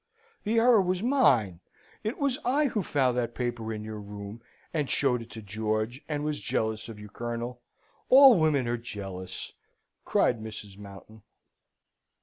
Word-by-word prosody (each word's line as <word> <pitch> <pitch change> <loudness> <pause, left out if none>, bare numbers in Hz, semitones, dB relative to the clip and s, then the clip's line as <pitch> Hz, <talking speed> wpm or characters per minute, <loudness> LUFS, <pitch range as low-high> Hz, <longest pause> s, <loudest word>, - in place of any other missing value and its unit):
"The 225 +2 0
error 230 -2 +6
was 185 +1 -1
mine! 130 - +3 0.4
It 220 +3 -2
was 280 -1 0
I 285 +4 +2
who 215 - -1
found 135 -7 +1
that 120 -1 -3
paper 120 -2 -3
in 105 -1 -5
your 110 0 -6
room, 105 +2 -8 0.3
and 150 -4 -1
showed 125 -4 +2
it 115 - -11
to 110 - -9
George, 110 +4 -2
and 145 -1 -2
was 150 -1 -2
jealous 110 0 -2
of 110 -2 -9
you, 105 - -9
Colonel. 120 +3 -5 0.5
All 265 -5 +9
women 150 -6 +2
are 120 +1 0
jealous," 95 -5 -7 0.5
cried 115 -3 +2
Mrs. 105 -3 -8
Mountain. 100 +2 -12
120 Hz, 155 wpm, -28 LUFS, 110-155 Hz, 0.5 s, All